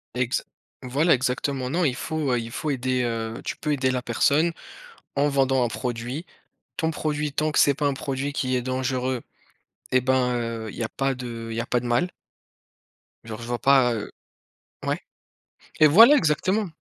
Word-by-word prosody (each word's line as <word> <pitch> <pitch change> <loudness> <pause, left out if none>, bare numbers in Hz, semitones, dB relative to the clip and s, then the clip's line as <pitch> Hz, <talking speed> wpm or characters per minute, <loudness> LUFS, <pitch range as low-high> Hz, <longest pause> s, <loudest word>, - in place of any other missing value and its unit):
Exa 125 0 0 0.4
voilà, 140 +7 +2
exactement, 130 +1 -1
non 175 +5 0
il 130 -2 +1
faut, 155 -3 -2
heu, 120 - +2
il 115 0 -6
faut 155 - -3
aider, 130 -2 0
heu, 115 -1 -3
tu - - -4
peux 150 - -2
aider 130 -2 +1
la 125 -1 -1
personne 145 +8 +2 0.6
en 145 +1 +2
vendant 135 -2 +2
un - - 0
produit. 125 +6 -4 0.5
Ton 160 0 0
produit, 150 -2 -2
tant 155 +1 0
que - - +1
c'est 140 - +5
pas 145 +1 -1
un 140 - +1
produit 135 +1 -3
qui 130 -2 -1
est 125 - -1
dangereux 130 -1 -1 0.7
eh 130 - +5
ben, 125 -1 +2
heu, 115 -2 -3
il - - -11
y 115 - -2
a 110 - -3
pas 135 -1 -1
de 115 -2 -6
il - - -4
y - - -2
a - - -5
pas 125 - +1
de 120 - -8
mal. 120 +10 +1 1.1
Genre, 115 0 -7
je 115 - -7
vois 120 0 -2
pas, 130 -3 +4
heu 105 - -5 0.8
ouais? - - 0 0.8
Et 155 - +8
voilà, 230 - +8
exactement! 185 - +1
130 Hz, 195 wpm, -24 LUFS, 120-145 Hz, 1.1 s, Et